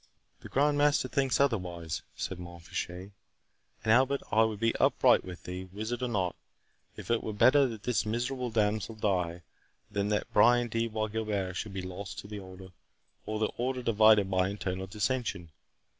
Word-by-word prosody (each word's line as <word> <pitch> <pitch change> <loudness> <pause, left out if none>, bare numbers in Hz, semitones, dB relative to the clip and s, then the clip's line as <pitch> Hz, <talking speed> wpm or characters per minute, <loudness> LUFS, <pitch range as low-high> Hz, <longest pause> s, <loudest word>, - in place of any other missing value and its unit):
"The - - -11
Grand 145 +1 +2
Master 145 0 +3
thinks 135 -3 +1
otherwise," 90 - -1
said 95 - -4
Mont 85 -1 -10
Fitchet; 90 +3 -5 0.7
"and, 110 - +2
Albert, 135 +3 +3
I 110 - +4
will 110 -2 -2
be 115 +2 +1
upright - - +4
with 90 -2 -9
thee—wizard 100 +7 -5
or 125 - 0
not, 95 -6 -1 0.6
it - - -8
were 110 - -4
better 130 +6 +5
that 110 -4 -7
this 125 -2 +1
miserable 125 +3 -2
damsel 110 0 0
die, 90 -5 -1 0.5
than 100 0 -1
that 105 -1 -1
Brian 120 +2 +5
de 115 +1 0
Bois 110 -1 -2
Guilbert 105 -4 -2
should 105 +1 -4
be 95 -1 -4
lost 95 +2 -7
to - - -7
the 105 0 -6
Order, 95 0 -11 0.6
or 110 - -2
the 110 - +1
Order 125 +1 -2
divided 110 -3 +5
by 95 0 +2
internal 95 -2 -4
dissension. 105 -3 -2
105 Hz, 170 wpm, -30 LUFS, 95-120 Hz, 0.7 s, better